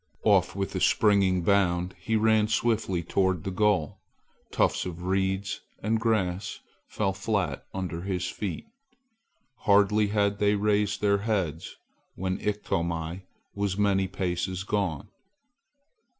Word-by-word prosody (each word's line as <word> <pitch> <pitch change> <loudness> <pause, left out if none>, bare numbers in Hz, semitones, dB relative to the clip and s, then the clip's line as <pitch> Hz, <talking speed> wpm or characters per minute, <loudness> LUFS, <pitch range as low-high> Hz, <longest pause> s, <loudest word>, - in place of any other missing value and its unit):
Off - - +3
with 100 -1 -3
a 95 - -1
springing 95 -3 +3
bound, 90 -1 +2
he 110 - -1
ran 110 -1 +3
swiftly 105 -5 0
toward 95 0 0
the 95 - -3
goal. 95 -5 +1 0.5
Tufts - - +1
of 90 -1 -6
reeds 95 +1 -1 0.2
and 110 +2 +1
grass 100 -5 -1 0.3
fell 100 -2 -1
flat 95 - -2
under 90 -3 -4
his 90 -1 -2
feet. 100 0 -4 0.9
Hardly 105 +1 +3
had 100 -1 +1
they 105 0 +3
raised 105 0 +1
their 100 -1 +3
heads 95 -7 -2 0.4
when 95 0 -2
Iktomi 85 -3 -2 0.3
was 100 -1 -2
many 100 -2 +2
paces 90 0 -2
gone. 100 -5 -2
95 Hz, 120 wpm, -27 LUFS, 90-105 Hz, 0.9 s, Off